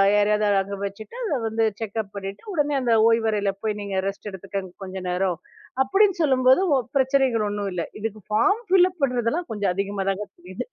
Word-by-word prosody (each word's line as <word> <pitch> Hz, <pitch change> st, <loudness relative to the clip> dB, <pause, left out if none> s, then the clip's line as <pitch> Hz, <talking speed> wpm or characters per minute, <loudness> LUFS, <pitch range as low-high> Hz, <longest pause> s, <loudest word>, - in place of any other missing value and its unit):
யாரையாவது 210 Hz, 0 st, +3 dB
அங்க 200 Hz, +1 st, -5 dB
வச்சிட்டு 215 Hz, -, -8 dB
அதை 300 Hz, -10 st, 0 dB
வந்து 225 Hz, +1 st, +1 dB, 0.2 s
செக்கப் 220 Hz, -2 st, -4 dB
பண்ணிட்டு 195 Hz, -, -7 dB
உடனே 295 Hz, -3 st, +1 dB
அந்த 240 Hz, -2 st, +2 dB, 0.2 s
ஓய்வறைல 220 Hz, -3 st, +2 dB
போய் 210 Hz, -1 st, -1 dB
நீங்க 200 Hz, -1 st, -3 dB
ரெஸ்ட் 195 Hz, +1 st, -5 dB
எடுத்துக்கோங்க 190 Hz, -1 st, -6 dB
கொஞ்ச 190 Hz, 0 st, -7 dB
நேரம் 180 Hz, -1 st, 0 dB, 0.5 s
அப்படின்னு 390 Hz, +7 st, +3 dB
சொல்லும்போது 260 Hz, +2 st, +4 dB, 0.2 s
ஒ -, -, +3 dB, 0.2 s
பிரச்சனைகள் 260 Hz, -4 st, +2 dB
ஒண்ணும் 205 Hz, -1 st, -2 dB
இல்லை. 170 Hz, -2 st, -3 dB
இதுக்கு 215 Hz, -1 st, -4 dB
ஃபார்ம் 400 Hz, -, +3 dB
ஃபில் 370 Hz, -1 st, +6 dB
அப் 350 Hz, -3 st, -21 dB
பண்றதெல்லாம் 250 Hz, +5 st, 0 dB
கொஞ்சம் 200 Hz, -4 st, 0 dB
அதிகமாதாங்க 195 Hz, 0 st, -2 dB
தெரியுது. 180 Hz, +2 st, -7 dB
215 Hz, 170 wpm, -24 LUFS, 195-260 Hz, 0.5 s, ஃபில்